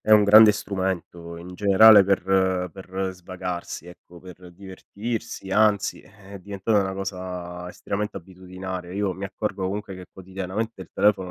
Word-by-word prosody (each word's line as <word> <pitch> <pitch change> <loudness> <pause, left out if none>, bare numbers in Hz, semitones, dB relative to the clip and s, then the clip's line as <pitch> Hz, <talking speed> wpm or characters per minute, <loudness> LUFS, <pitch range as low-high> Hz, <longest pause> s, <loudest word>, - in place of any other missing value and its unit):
è 110 - -4
un 105 -1 +7
grande 105 +1 +8
strumento 95 -4 -4
in 90 +2 -10
generale 100 +1 +7
per 95 -1 +1
per 95 0 -4
svagarsi, 90 -2 -6
ecco, 90 0 -15
per 90 0 -13
divertirsi, 100 +3 -7
anzi, 105 -1 +2
è 100 0 -14
diventata 100 +2 0
una 95 -1 -2
cosa 90 -2 -6
estremamente 105 +3 -4
abitudinaria. 90 0 -8
Io 100 -1 -1
mi 95 +2 -7
accorgo, 100 -1 -3
comunque, 100 0 -5
che 90 -1 -10
quotidianamente 95 +3 -5
il 95 - -10
telefono 95 -2 +2
95 Hz, 145 wpm, -24 LUFS, 90-100 Hz, -, grande